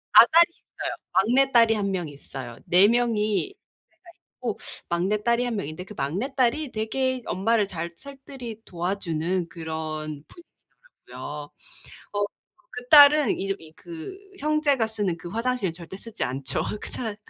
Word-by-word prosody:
아 -, -, +12 dB
딸이 340 Hz, +1 st, +5 dB
있어요. -, -, -6 dB, 0.2 s
막내딸이 235 Hz, +1 st, +5 dB
1 200 Hz, -2 st, -1 dB
명 180 Hz, -4 st, -2 dB
있어요. 135 Hz, -4 st, -9 dB
4 185 Hz, +3 st, +6 dB
명이 230 Hz, -, +1 dB, 0.4 s
형제가 -, -, -39 dB, 0.3 s
있고 240 Hz, -4 st, -4 dB, 0.3 s
막내딸이 210 Hz, +7 st, +1 dB
1 240 Hz, -2 st, -2 dB
명인데 155 Hz, -3 st, -4 dB
그 210 Hz, -, -10 dB
막내딸이 250 Hz, -, 0 dB
되게 260 Hz, +4 st, -1 dB
엄마를 210 Hz, +2 st, +1 dB
잘 170 Hz, -2 st, -5 dB
살뜰히 265 Hz, -3 st, -9 dB
도와주는 175 Hz, -1 st, -2 dB
그런 155 Hz, -3 st, -5 dB
분위기더라고요. 245 Hz, -, -11 dB, 0.6 s
어 205 Hz, 0 st, +1 dB, 0.5 s
그 245 Hz, 0 st, -8 dB
딸은 290 Hz, -4 st, +8 dB
이제 195 Hz, 0 st, -1 dB
이 160 Hz, -1 st, -11 dB
그 170 Hz, -, -8 dB, 0.2 s
형제가 290 Hz, -6 st, +2 dB
쓰는 205 Hz, -6 st, -2 dB
그 170 Hz, -, -9 dB
화장실을 230 Hz, -3 st, -1 dB
절대 175 Hz, +2 st, -9 dB
쓰지 230 Hz, +2 st, -5 dB
않죠. 135 Hz, +1 st, -1 dB, 0.2 s
그 -, -, -6 dB
차 220 Hz, -4 st, -3 dB
210 Hz, 280 characters per minute, -25 LUFS, 170-250 Hz, 0.6 s, 아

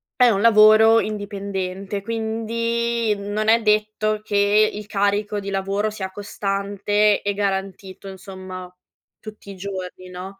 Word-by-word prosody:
è 250 Hz, -1 st, +5 dB
un 200 Hz, -4 st, +1 dB
lavoro 220 Hz, +1 st, +6 dB
indipendente, 200 Hz, -2 st, -4 dB
quindi 230 Hz, +1 st, -1 dB
non 205 Hz, +2 st, -2 dB
è 230 Hz, +1 st, +5 dB
detto 215 Hz, 0 st, 0 dB
che 205 Hz, 0 st, +3 dB
il 210 Hz, 0 st, -7 dB
carico 205 Hz, 0 st, 0 dB
di 200 Hz, -, -6 dB
lavoro 195 Hz, +2 st, -1 dB
sia 205 Hz, -3 st, -5 dB
costante 205 Hz, +1 st, 0 dB
e 205 Hz, -, -1 dB
garantito, 195 Hz, -1 st, -4 dB
insomma, 185 Hz, -1 st, -9 dB, 0.5 s
tutti 215 Hz, -2 st, -12 dB
i 195 Hz, -, -11 dB
giorni, 185 Hz, -1 st, -7 dB
no? 185 Hz, +2 st, -9 dB
205 Hz, 125 wpm, -22 LUFS, 195-215 Hz, 0.5 s, lavoro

